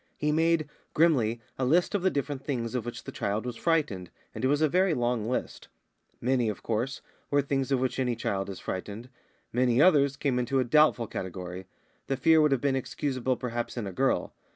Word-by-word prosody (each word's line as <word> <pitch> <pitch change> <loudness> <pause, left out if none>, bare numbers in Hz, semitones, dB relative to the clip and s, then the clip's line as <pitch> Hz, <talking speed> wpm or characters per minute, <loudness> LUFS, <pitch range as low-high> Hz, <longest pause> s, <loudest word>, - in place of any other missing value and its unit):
He 150 0 0
made, 160 0 +2 0.3
grimly, 125 -9 +3 0.2
a - - +1
list 165 +10 +3
of 205 - +1
the 190 - +3
different 140 -3 -3
things 120 -5 -3
of 125 -2 -2
which 120 - -6
the - - -7
child 105 +3 -2
was 125 -1 -4
frightened, 140 - 0 0.2
and 110 - -6
it - - +4
was 145 +2 +2
a - - +5
very 180 +2 +2
long 120 -2 0
list. 125 - -3 0.5
Many, 125 -2 +1
of 105 - -6
course, 120 +4 -2 0.3
were 145 0 +2
things 135 -1 -1
of 135 - +3
which 130 +1 -1
any 125 -2 +1
child 100 -3 -2
is 95 - -6
frightened; 105 +6 -6 0.4
many 125 0 +2
others 140 -4 +5
came 135 -3 0
into 130 +2 0
a - - +3
doubtful 125 -1 +4
category; 90 -2 -6 0.4
the 135 - -1
fear 160 +2 +5
would 150 -1 +3
have 135 -3 +2
been 140 -2 +1
excusable, 130 -1 -2
perhaps, 120 -1 -4
in 115 - -2
a 100 - -4
girl. 135 +7 0
130 Hz, 205 wpm, -28 LUFS, 115-145 Hz, 0.5 s, a